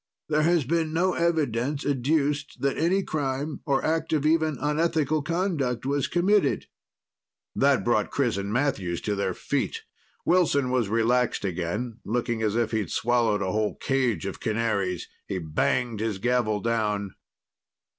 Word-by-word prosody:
There 150 0 +2
has 165 0 +3
been 160 +3 0
no 180 +3 +2
evidence 145 -5 0
adduced 145 +1 0
that 140 0 +1
any 185 +5 +2
crime 145 -1 -3
or 135 -2 +1
act 160 0 0
of 150 -2 +1
even 160 -2 +2
unethical 155 0 +1
conduct 155 - -1
was 140 0 0
committed." 195 +4 +2 0.9
That - - +3
brought - - +1
Chris - - 0
and 100 +1 -3
Matthews 115 -9 0
to 105 - -1
their 100 -2 -1
feet. 445 - -2 0.4
Wilson 145 -7 +3
was 120 -5 +1
relaxed 115 0 +1
again, 100 +7 -3
looking 120 0 -1
as 110 -1 0
if 115 -2 +1
he'd 110 -6 -1
swallowed 115 -4 +1
a 95 - -1
whole 110 +1 0
cage 125 - 0
of 100 - -5
canaries. 105 -5 -1 0.2
He 95 - -2
banged 105 +8 0
his 110 -2 -1
gavel 110 -1 +1
down. 105 -4 -1
125 Hz, 145 wpm, -26 LUFS, 110-155 Hz, 0.9 s, has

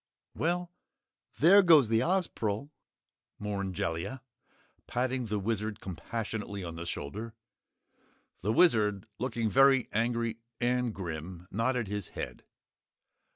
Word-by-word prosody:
"Well 175 +2 -1 0.7
there 190 +7 +8
goes 160 - +7
the 115 +1 +3
Ozpril," 140 - -1 0.7
mourned 100 -3 -3
Jellia, 100 +7 -3 0.6
patting 125 0 -1
the 105 0 -1
Wizard 105 +1 -2
compassionately 100 +1 -4
on 85 -2 -5
the 85 +1 -6
shoulder. 105 +10 -5 1.1
The 105 - 0
Wizard, 110 - +4
looking 120 -2 -1
very 135 +3 +5
angry 115 0 0 0.2
and 125 0 +1
grim, 90 -1 -6
nodded 115 +2 0
his 105 -2 -3
head. - - -5
110 Hz, 110 wpm, -30 LUFS, 100-130 Hz, 1.1 s, there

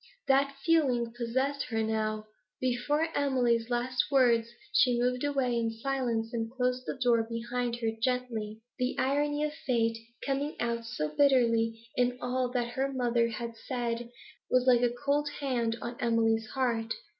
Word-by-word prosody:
That 275 +1 +3
feeling 255 -9 +2
possessed 260 +4 -1
her 225 -2 -1
now; 215 -1 -1 0.3
before 260 +6 0
Emily's 245 -5 +2
last 245 +1 0
words 240 -4 +4 0.2
she 245 -2 +4
moved 250 +1 0
away 270 -4 +1
in 230 -1 +1
silence 230 -1 -2
and 225 -1 -2
closed 250 0 -1
the - - -3
door 240 -3 +3
behind 235 +1 -2
her 225 -1 +1
gently. 230 -4 -2 0.2
The 250 +1 0
irony 290 +2 +1
of 300 0 -1
fate, 230 -6 0 0.3
coming 280 +2 -1
out 235 -1 -1
so 150 -9 -3
bitterly 230 -4 +3
in 245 0 +1
all 250 0 -1
that 245 -1 -1
her 270 +3 -1
mother 240 -3 +1
had 230 +1 -5
said, 235 0 -3 0.4
was 255 0 +3
like 245 -2 +5
a 245 - +4
cold 285 +4 0
hand 240 -5 0
on 235 0 -4
Emily's 225 -1 +2
heart. 235 -4 -1
245 Hz, 155 wpm, -30 LUFS, 230-260 Hz, 0.4 s, like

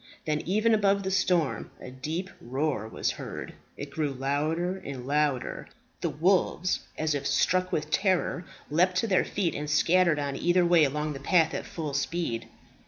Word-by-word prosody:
Then 150 -1 0
even 215 +5 +3
above 200 -2 +3
the 190 - -2
storm 180 -5 +1
a 125 - -9
deep 160 +9 -4
roar 130 -2 -2
was - - -1
heard. - - -7 0.2
It 140 0 -7
grew 150 0 -1
louder 155 +7 -1
and 135 -8 -7
louder. 145 -2 0 0.3
The - - -1
wolves, 185 +2 +1 0.2
as 155 -1 0
if 140 -1 -2
struck 185 +5 +2
with 155 0 -2
terror, 185 -2 +1 0.3
leaped 180 +4 +3
to 205 +5 +1
their 190 -3 +3
feet, 185 -5 -1
and 150 +1 -4
scattered 170 +1 +4
on 140 -1 -2
either 175 +4 +3
way 170 -3 +5
along 150 +2 -2
the 135 - -7
path 160 +3 +3
at - - -4
full 155 -4 -5
speed. 145 -5 -2
160 Hz, 170 wpm, -28 LUFS, 145-185 Hz, 0.3 s, way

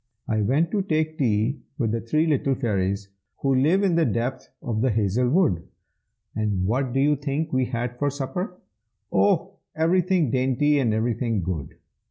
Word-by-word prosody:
I 110 -1 0
went 145 +10 +1
to 205 - +1
take 155 -3 -1
tea 115 +1 +1 0.2
with 115 -7 0
the 115 0 -1
three 155 +8 +1
little 140 -3 +1
fairies 100 -5 -1 0.3
Who 135 -1 +3
live 155 +10 +3
in 190 -3 +2
the 165 0 +3
depth 120 +1 -2
of 110 -3 -2
the 130 - +2
hazel 110 +3 +1
wood. 145 - +2 0.7
And 105 -4 0
what 125 +5 0
do 135 - 0
you 145 +2 +3
think 145 +2 -3
we 130 0 +2
had 120 0 -4
for 145 - +1
supper? 145 +7 -4 0.5
Oh! 100 +1 +2 0.2
everything 175 - +2
dainty 135 +3 +2
and 120 -5 +2
everything 115 -2 0
good. 80 -6 -4
130 Hz, 170 wpm, -24 LUFS, 110-150 Hz, 0.7 s, Who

